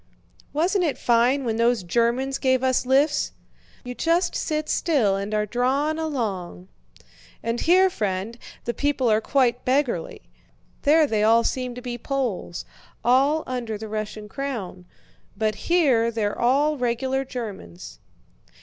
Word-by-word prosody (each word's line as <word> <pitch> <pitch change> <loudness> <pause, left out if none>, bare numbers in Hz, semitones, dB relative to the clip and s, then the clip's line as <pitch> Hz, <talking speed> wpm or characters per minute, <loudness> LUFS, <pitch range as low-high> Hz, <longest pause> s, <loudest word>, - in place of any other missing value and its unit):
"Wasn't 360 +6 +1
it 310 -5 0
fine 245 +3 +2
when 225 -2 -1
those 235 -2 +2
Germans 240 +8 0
gave 260 -1 +2
us 255 -1 +1
lifts! 285 +3 +2 0.5
You 250 - -6
just 335 +6 +1
sit 305 0 -2
still 255 - +2
and 200 +1 -4
are 210 0 +1
drawn 270 +8 0
along." 200 - -4 0.7
"And 230 +1 -2
here, 370 +3 +5
friend, 205 - -3 0.3
the 235 - -1
people 265 -2 +1
are 215 +1 +3
quite 250 -1 +1
beggarly. 255 - -1 0.6
There 310 +2 +5
they 220 -6 0
all 225 +2 +5
seemed 250 0 -2
to 250 - -9
be 240 -1 -5
Poles—all 265 - -1
under 240 -4 -4
the 220 +1 -7
Russian 215 0 -5
crown—but 215 -2 -6
here 270 -10 +3
they're 220 -3 -1
all 285 +5 +2
regular 260 +2 0
Germans." 140 - -8
245 Hz, 130 wpm, -24 LUFS, 215-275 Hz, 0.7 s, here